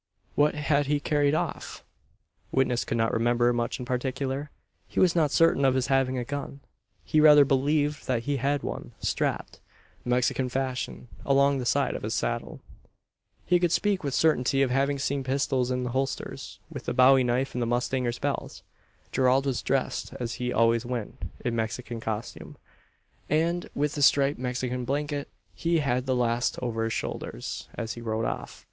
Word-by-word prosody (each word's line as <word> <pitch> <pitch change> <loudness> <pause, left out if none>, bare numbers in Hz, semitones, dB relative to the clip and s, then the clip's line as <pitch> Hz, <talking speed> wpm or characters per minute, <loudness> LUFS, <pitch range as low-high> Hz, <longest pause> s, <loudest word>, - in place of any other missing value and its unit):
What 150 +1 +3
had 145 -1 +1
he 145 0 +1
carried 145 0 +1
off? - - -4 0.7
Witness 125 -2 +1
could - - -2
not 115 0 +1
remember 120 +1 +2
much 120 -1 -1
in 125 - -6
particular. 130 +3 -2 0.4
He - - -3
was 180 -2 +4
not 160 -3 +3
certain 165 -1 +3
of 135 -1 +4
his 130 0 +1
having 130 -1 +2
a 125 - -1
gun. 140 +1 -6 0.4
He 155 - +2
rather 150 -2 +8
believed 145 +2 +1
that 120 -3 0
he 145 +1 -1
had 140 +2 0
one - - -6
strapped, - - -2 0.4
Mexican 125 +1 +1
fashion, 130 -1 -3 0.2
along 140 0 +3
the 125 - -3
side 140 +1 +2
of - - -5
his 110 +2 -2
saddle. 120 0 -3 0.8
He 175 0 +3
could 175 -2 +1
speak 200 0 +1
with 140 -2 -2
certainty 135 -3 +3
of 130 - 0
having 140 +2 +1
seen 140 0 -1
pistols 130 -1 0
in 125 0 -1
the 125 - -3
holsters, 135 +2 -4
with - - -5
a - - -1
bowie 130 +1 +6
knife 125 +2 0
in 125 - -3
the 120 - 0
mustanger's 120 0 0
belt. - - -4 0.5
Gerald 130 +1 +3
was 135 -3 -1
dressed - - -1
as 120 -1 -3
he 125 0 -1
always 115 0 +3
went 120 -3 -5 0.2
in 120 - 0
Mexican 115 +1 -3
costume, 110 0 -5 0.7
and 170 +3 0
with 145 +1 0
a - - -1
striped 140 0 +4
Mexican 125 0 -2
blanket. 145 +2 -2 0.3
He 170 0 0
had 130 -3 0
the 130 - +2
last 120 0 0
over 115 -2 -2
his 115 - -2
shoulders - - -5
as 115 -1 -4
he 120 - -9
rode 110 -1 -2
off. - - -5
130 Hz, 175 wpm, -27 LUFS, 120-145 Hz, 0.8 s, rather